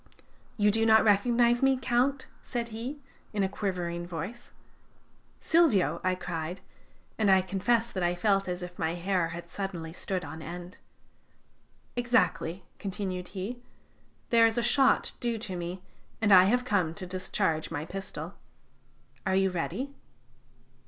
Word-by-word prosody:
"'You 205 Hz, -1 st, +4 dB
do 225 Hz, +2 st, +2 dB
not 220 Hz, 0 st, +6 dB
recognize 235 Hz, +3 st, +4 dB
me, 270 Hz, -1 st, +4 dB
Count?' 260 Hz, +3 st, +1 dB, 0.2 s
said 235 Hz, -2 st, -3 dB
he, 235 Hz, +6 st, -5 dB, 0.4 s
in 205 Hz, -2 st, +1 dB
a -, -, +2 dB
quivering 175 Hz, -3 st, -3 dB
voice. 180 Hz, +8 st, -6 dB, 0.9 s
"'Silvio!' 320 Hz, -, +3 dB
I 185 Hz, 0 st, +2 dB
cried, 175 Hz, 0 st, -5 dB, 0.6 s
and 210 Hz, -2 st, +3 dB
I 190 Hz, -1 st, +6 dB
confess 225 Hz, +5 st, +1 dB
that 185 Hz, -, -3 dB
I 175 Hz, 0 st, +1 dB
felt 195 Hz, +1 st, +2 dB
as 180 Hz, 0 st, -3 dB
if 180 Hz, 0 st, -9 dB
my 160 Hz, +1 st, 0 dB
hair 180 Hz, -1 st, 0 dB
had 170 Hz, +1 st, -7 dB
suddenly 175 Hz, -5 st, -5 dB
stood 185 Hz, -1 st, -2 dB
on 160 Hz, +2 st, -8 dB
end. 175 Hz, +2 st, -8 dB, 1.2 s
"'Exactly,' 190 Hz, -8 st, +1 dB
continued 190 Hz, -2 st, -3 dB
he. 235 Hz, +7 st, -4 dB, 0.7 s
'There 230 Hz, -1 st, +7 dB
is 225 Hz, -, -2 dB
a 240 Hz, -, +2 dB
shot 265 Hz, +3 st, +4 dB
due 235 Hz, -2 st, 0 dB
to 210 Hz, -4 st, -5 dB
me, 175 Hz, +1 st, -5 dB, 0.4 s
and 220 Hz, -2 st, +2 dB
I 185 Hz, -1 st, +9 dB
have 245 Hz, +5 st, +2 dB
come 180 Hz, -8 st, +1 dB
to 190 Hz, -, -6 dB
discharge 180 Hz, -3 st, -1 dB
my 155 Hz, -1 st, -4 dB
pistol. 195 Hz, +3 st, -6 dB, 0.9 s
Are 190 Hz, -, +2 dB
you 190 Hz, 0 st, +3 dB
ready?' 255 Hz, +10 st, -3 dB
195 Hz, 145 wpm, -29 LUFS, 180-230 Hz, 1.2 s, I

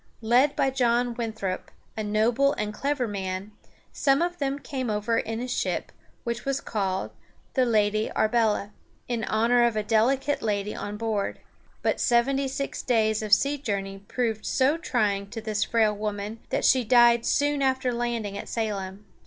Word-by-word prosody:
Led 250 Hz, +6 st, +4 dB
by 270 Hz, -, +2 dB
John 245 Hz, -2 st, +1 dB
Winthrop, 220 Hz, -5 st, -4 dB, 0.3 s
a 220 Hz, -, -3 dB
noble 225 Hz, +7 st, +2 dB
and 210 Hz, 0 st, -3 dB
clever 275 Hz, +1 st, -1 dB
man, 190 Hz, 0 st, -4 dB, 0.4 s
some 275 Hz, +2 st, +3 dB
of 350 Hz, 0 st, -3 dB
them 275 Hz, -1 st, -1 dB
came 265 Hz, -4 st, -4 dB
over 215 Hz, +2 st, 0 dB
in 225 Hz, 0 st, -3 dB
a 250 Hz, -, -3 dB
ship 250 Hz, -, -2 dB, 0.3 s
which 235 Hz, -1 st, -3 dB
was 275 Hz, 0 st, -1 dB
called 190 Hz, -3 st, -2 dB, 0.4 s
the 260 Hz, -2 st, +3 dB
Lady 215 Hz, -1 st, +2 dB
Arbela, 215 Hz, -2 st, +1 dB, 0.4 s
in 235 Hz, -2 st, -2 dB
honor 235 Hz, +2 st, +3 dB
of 235 Hz, -2 st, +2 dB
a 215 Hz, -, 0 dB
delicate 260 Hz, +7 st, +2 dB
lady 210 Hz, -1 st, -1 dB
on 205 Hz, 0 st, -5 dB
board. 215 Hz, -2 st, -2 dB, 0.4 s
But -, -, +1 dB
seventy 270 Hz, +3 st, +2 dB
six 275 Hz, +1 st, -4 dB
days 220 Hz, -3 st, +1 dB
of 215 Hz, -1 st, -5 dB
sea 280 Hz, +7 st, +4 dB
journey 195 Hz, -6 st, -3 dB
proved 220 Hz, +1 st, -2 dB
so 265 Hz, +4 st, +2 dB
trying 210 Hz, -, -1 dB
to 225 Hz, -, -6 dB
this 215 Hz, -1 st, -1 dB
frail 220 Hz, -2 st, +2 dB
woman 210 Hz, +1 st, -4 dB
that -, -, 0 dB
she 255 Hz, -1 st, +5 dB
died 235 Hz, 0 st, +5 dB
soon 290 Hz, +2 st, +1 dB
after 260 Hz, -2 st, +1 dB
landing 235 Hz, -4 st, -2 dB
at -, -, -8 dB
Salem. 205 Hz, -3 st, -3 dB
230 Hz, 165 wpm, -26 LUFS, 210-255 Hz, 0.4 s, she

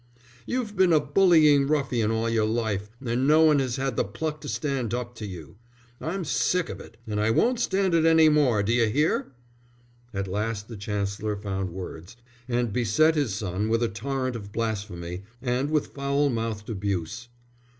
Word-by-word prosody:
"You've 240 Hz, -5 st, -2 dB
been 185 Hz, -2 st, +4 dB
a 155 Hz, -, +6 dB
bullying 150 Hz, -2 st, +4 dB
ruffian 135 Hz, -7 st, +1 dB
all 115 Hz, +1 st, 0 dB
your 115 Hz, -2 st, +1 dB
life, 110 Hz, -3 st, -1 dB, 0.2 s
and 125 Hz, +3 st, 0 dB
no 155 Hz, +2 st, +6 dB
one 155 Hz, -2 st, +5 dB
has 130 Hz, -3 st, -1 dB
had 135 Hz, -2 st, -2 dB
the -, -, +3 dB
pluck 150 Hz, +9 st, -4 dB
to 145 Hz, -, -6 dB
stand 135 Hz, -6 st, -2 dB
up 120 Hz, -1 st, -4 dB
to 110 Hz, -, -5 dB
you. 90 Hz, -2 st, -10 dB, 0.4 s
I'm 180 Hz, +2 st, -3 dB
sick 180 Hz, +4 st, +1 dB
of -, -, -6 dB
it, -, -, -13 dB
and 105 Hz, -1 st, -2 dB
I 105 Hz, -, +2 dB
won't 235 Hz, -, +2 dB
stand 195 Hz, -5 st, +1 dB
it 165 Hz, -1 st, +4 dB
any 160 Hz, -1 st, +6 dB
more. 140 Hz, -9 st, +3 dB
D'you 115 Hz, +2 st, +2 dB
hear?" 145 Hz, +3 st, +1 dB, 0.8 s
At 100 Hz, -1 st, -3 dB
last 105 Hz, +2 st, -3 dB
the 115 Hz, -, -7 dB
Chancellor 105 Hz, 0 st, -3 dB
found 95 Hz, -2 st, -3 dB
words, 90 Hz, +3 st, -8 dB, 0.3 s
and 120 Hz, -3 st, 0 dB
beset 125 Hz, +7 st, +3 dB
his 140 Hz, -10 st, 0 dB
son 100 Hz, +1 st, -2 dB
with 115 Hz, +1 st, +2 dB
a 115 Hz, -, +1 dB
torrent 130 Hz, +4 st, -3 dB
of 100 Hz, -3 st, -7 dB
blasphemy, 95 Hz, -6 st, -4 dB, 0.2 s
and 125 Hz, +3 st, -1 dB
with 150 Hz, -2 st, -1 dB
foul 140 Hz, +1 st, +1 dB
mouthed 115 Hz, -2 st, -3 dB
abuse. 100 Hz, +2 st, -3 dB
120 Hz, 180 wpm, -26 LUFS, 105-145 Hz, 0.8 s, a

